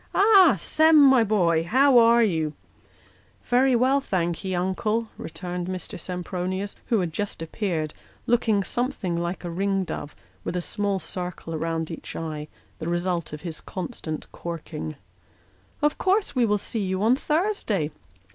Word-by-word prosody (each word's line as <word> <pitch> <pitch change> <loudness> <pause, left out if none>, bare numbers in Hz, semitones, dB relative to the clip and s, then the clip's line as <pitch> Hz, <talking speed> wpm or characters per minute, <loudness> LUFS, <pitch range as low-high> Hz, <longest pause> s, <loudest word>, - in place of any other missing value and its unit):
Ah! 390 - +7
Sem, 315 0 +4
my 265 -4 +7
boy, 175 -7 +2
how 260 +7 +5
are 235 0 +6
you? 160 -7 0 0.5
" - - -32
"Very 255 +1 +4
well, 260 +4 +3
thank'ee, 180 - -1
uncle," 210 +5 -1
returned 180 -1 -5
Mr. 185 -2 -5
Sempronius, 185 +2 -3
who 225 -5 +2
had 170 -3 -3
just 205 +5 -3
appeared, 165 -2 -2 0.3
looking 225 -4 +2
something 240 -7 -2
like 170 +2 -3
a 175 - -3
ringdove, 190 -4 -2 0.3
with 175 - -3
a - - +1
small 205 0 -1
circle 180 -3 -5
round 165 +1 -2
each 165 - -8
eye: 155 -2 -4 0.3
the 160 - -3
result 175 -1 -1
of 150 0 -7
his 165 -3 -6
constant 160 -4 -5
corking. 155 - -6 0.4
" 95 +2 -35
Of 295 0 +2
course 390 +2 +1
we 225 -5 +3
see 210 +1 -3
you 190 +1 -1
on 235 +3 +5
Thursday." 300 - 0
185 Hz, 145 wpm, -25 LUFS, 170-235 Hz, 0.5 s, Ah